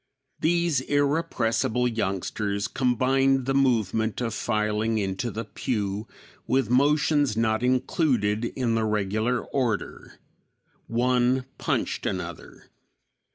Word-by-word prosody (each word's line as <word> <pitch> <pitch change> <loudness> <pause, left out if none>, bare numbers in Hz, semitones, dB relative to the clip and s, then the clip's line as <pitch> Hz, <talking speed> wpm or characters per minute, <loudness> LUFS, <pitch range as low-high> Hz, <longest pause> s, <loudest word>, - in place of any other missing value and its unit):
These 170 -4 +2
irrepressible 140 -5 +1
youngsters 100 -1 -2
combined 135 +1 +2
the 135 - 0
movement 110 -5 +1
of 115 -3 -2
filing 110 0 0
into 100 +3 -2
the 115 +1 -5
pew 105 -2 -3 0.4
with 130 -3 +1
motions 145 -2 +3
not 110 -1 +1
included 125 -4 +1
in 120 -1 -1
the 115 0 +1
regular 110 +3 0
order. 120 -6 -3 0.7
One 125 +2 +1
punched - - -1
another. - - -6
120 Hz, 100 wpm, -26 LUFS, 110-130 Hz, 0.7 s, motions